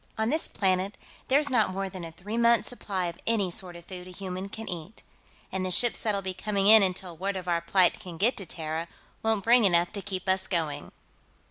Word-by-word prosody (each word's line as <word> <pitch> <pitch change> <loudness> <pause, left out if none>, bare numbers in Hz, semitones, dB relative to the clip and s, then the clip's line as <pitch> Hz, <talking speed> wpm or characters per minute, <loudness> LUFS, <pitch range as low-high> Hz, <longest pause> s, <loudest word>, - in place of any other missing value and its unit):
"On 220 +2 +1
this 315 +2 +2
planet, 190 0 0 0.3
there's 285 +2 +3
not 220 -6 +3
more 195 +1 -2
than 185 -2 -8
a 165 - -7
three 185 +7 -7
months' 235 0 +4
supply 195 -6 -3
of 170 -1 -5
any 205 -5 +2
sort 175 0 -2
of 170 0 -11
food 180 -1 -9
a - - -9
human 185 +1 -6
can 225 +2 -7
eat. 175 +4 -6 0.5
And 190 -1 -2
the 185 - -1
ships 240 +6 +2
that'll 205 -3 -1
be 190 0 -3
coming 200 0 -1
in 220 +1 +9
until 185 -2 -1
word 195 +4 -2
of 185 -1 -5
our 170 -1 +1
plight 180 +1 +3
can 175 -3 -9
get 225 +8 +2
to 195 - -6
Terra 160 +1 -4 0.3
won't 220 -3 +1
bring 235 +1 +5
enough 175 -3 +3
to 205 - -4
keep 190 -2 -5
us 190 0 +1
going. 160 -5 -2
190 Hz, 225 wpm, -28 LUFS, 180-215 Hz, 0.5 s, in